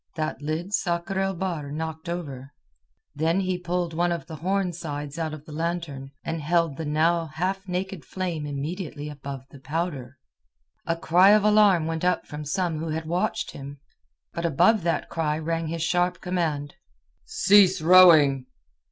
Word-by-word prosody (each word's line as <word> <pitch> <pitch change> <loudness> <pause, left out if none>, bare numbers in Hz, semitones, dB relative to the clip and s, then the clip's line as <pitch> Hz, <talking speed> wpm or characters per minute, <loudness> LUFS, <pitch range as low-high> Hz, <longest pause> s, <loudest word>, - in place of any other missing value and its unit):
That 155 -3 -3
lid 160 +6 -3
Sakr 175 0 -1
el 195 0 0
Bahr 165 -6 -3
knocked 160 +2 -5
over; 140 -6 -6 0.6
then 165 +5 +1
he 185 -1 -1
pulled 175 -1 -2
one 175 +2 +1
of 170 -1 -3
the 160 -2 -8
horn 185 +2 -1
sides 145 -2 -6
out 160 -1 -2
of 155 -1 -9
the 155 - -11
lantern, 160 -4 -3
and 165 -1 -3
held 165 -1 +1
the 160 - -4
now 165 +3 +1
half 185 +5 -3
naked 185 -2 -3
flame 170 -2 -4
immediately 150 +1 -5
above 140 -2 -8
the 140 - -13
powder. 140 -3 -4 0.7
A 165 - +1
cry 175 +3 +5
of 210 0 +6
alarm 210 -5 +5
went 165 0 -3
up 180 0 +1
from 150 0 -7
some 165 +1 -1
who 165 +1 -4
had 160 +1 -3
watched 170 0 -1
him. 140 +1 -9 0.5
But 170 - -4
above 205 +8 +4
that 170 0 -1
cry 155 -2 -1
rang 165 +1 -2
his 165 0 -3
sharp 175 0 +1
command: 160 -5 -2 0.5
"Cease 195 -2 +5
rowing!" 155 -6 +6
165 Hz, 165 wpm, -25 LUFS, 150-180 Hz, 0.7 s, of